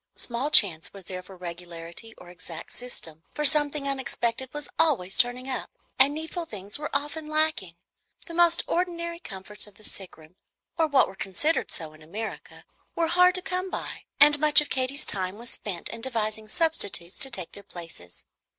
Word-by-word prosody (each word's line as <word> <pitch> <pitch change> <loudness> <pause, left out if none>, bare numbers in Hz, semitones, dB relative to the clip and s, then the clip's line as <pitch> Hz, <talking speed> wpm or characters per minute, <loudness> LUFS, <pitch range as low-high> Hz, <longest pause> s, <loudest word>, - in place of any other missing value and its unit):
Small 245 +4 -2
chance 190 - +6
was 195 -1 -11
there 185 +1 -6
for 185 +1 -13
regularity 170 +4 -8
or 175 - -12
exact 170 -2 -8
system; 165 -10 -4
for 300 - 0
something 295 0 +3
unexpected 260 -2 -1
was 295 +1 -5
always 265 - +3
turning 250 +1 +2
up, 260 -1 -3 0.3
and 270 +2 +7
needful 320 +3 -4
things 205 -3 -4
were 300 - -3
often 295 +2 -2
lacking. 310 - +1 0.5
The 335 - -9
most 340 0 +4
ordinary 340 -1 -1
comforts 210 - -7
of 205 - -16
the 215 - -19
sick 190 -3 -7
room, 160 +3 -18 0.4
or 325 -2 +2
what 285 -3 +4
are - - -9
considered 195 - 0
so 155 -2 -6
in 155 - -17
America, 205 +8 -7 0.3
were 330 -1 +1
hard 360 +1 +5
to 370 - +3
come 370 +1 -2
by, - - -5
and 295 +1 +9
much 300 0 +8
of 300 - -2
Katy's 260 +2 0
time 185 0 -2
was 235 +1 -1
spent 185 -5 -2
in 230 - -6
devising 220 -3 -2
substitutes 215 - 0
to 270 - +2
take 190 -9 -6
their 200 - -9
places. 165 - -10
240 Hz, 180 wpm, -27 LUFS, 185-300 Hz, 0.5 s, and